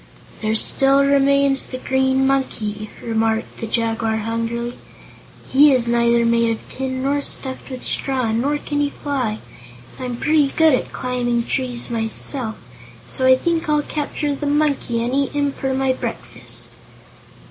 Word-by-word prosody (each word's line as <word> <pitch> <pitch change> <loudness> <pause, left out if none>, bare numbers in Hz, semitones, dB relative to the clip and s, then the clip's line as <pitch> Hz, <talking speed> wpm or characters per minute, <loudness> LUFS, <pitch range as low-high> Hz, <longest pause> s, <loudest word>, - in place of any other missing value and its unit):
"There 215 0 0
still 275 +4 +4
remains 280 0 +3
the 255 - -5
Green 265 +1 +1
Monkey," 215 -6 -1
remarked 225 0 -1
the 225 - -5
Jaguar 225 0 0
hungrily. 230 +2 -3 0.7
"He 285 +1 +6
is 245 -2 +1
neither 235 0 +3
made 230 0 +3
of 225 - -4
tin 260 0 -4
nor 285 +1 +1
stuffed 265 -1 -2
with 255 -1 -7
straw, 255 -4 -1
nor 270 +7 +1
can 290 0 -3
he 290 0 +1
fly. 260 -8 -2 0.6
I'm 250 -2 -4
pretty 300 +2 +2
good 320 -2 +5
at 255 - 0
climbing 245 -2 -1
trees, 250 -3 -2
myself, 225 +1 -2 0.5
so 260 -1 0
I 260 0 +7
think 330 +2 -1
I'll 300 -1 +2
capture 295 -1 -2
the 285 +1 -4
Monkey 285 -5 +1
and 245 +2 -2
eat 275 0 0
him 285 -1 +1
for 270 -1 -3
my 265 -1 +1
breakfast." - - -4
260 Hz, 150 wpm, -20 LUFS, 235-280 Hz, 0.7 s, I